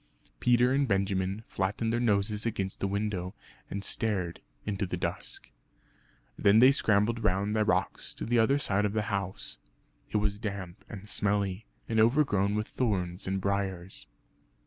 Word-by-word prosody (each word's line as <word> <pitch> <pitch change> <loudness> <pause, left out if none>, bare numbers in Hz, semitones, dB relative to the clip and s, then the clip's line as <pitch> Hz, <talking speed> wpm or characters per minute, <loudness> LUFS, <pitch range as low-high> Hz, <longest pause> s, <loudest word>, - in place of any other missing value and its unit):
Peter 125 - +4
and 140 0 +2
Benjamin 95 0 0
flattened 105 +4 -1
their 120 - +1
noses 105 -2 +1
against 100 -4 -2
the 100 - 0
window, 100 -2 -2 0.3
and 100 0 -4
stared 100 -5 -1 0.2
into 100 -1 -1
the - - -3
dusk. - - -4 0.9
Then 100 +2 +5
they 130 +4 +8
scrambled 110 -2 +2
round 100 +3 +1
the 110 - +3
rocks 95 -2 -1
to - - -5
the 120 +1 +2
other 135 +5 +4
side 105 -7 +1
of 105 - -1
the 110 -1 0
house. 100 -1 -4 0.5
It - - 0
was 105 -1 0
damp 100 -4 -5
and 105 -2 -8
smelly, 100 0 0 0.2
and 110 -1 +1
overgrown 110 -5 +3
with 105 +1 -2
thorns 95 -8 -1
and 95 +1 0
briars. 95 -2 -2
100 Hz, 155 wpm, -29 LUFS, 95-110 Hz, 0.9 s, they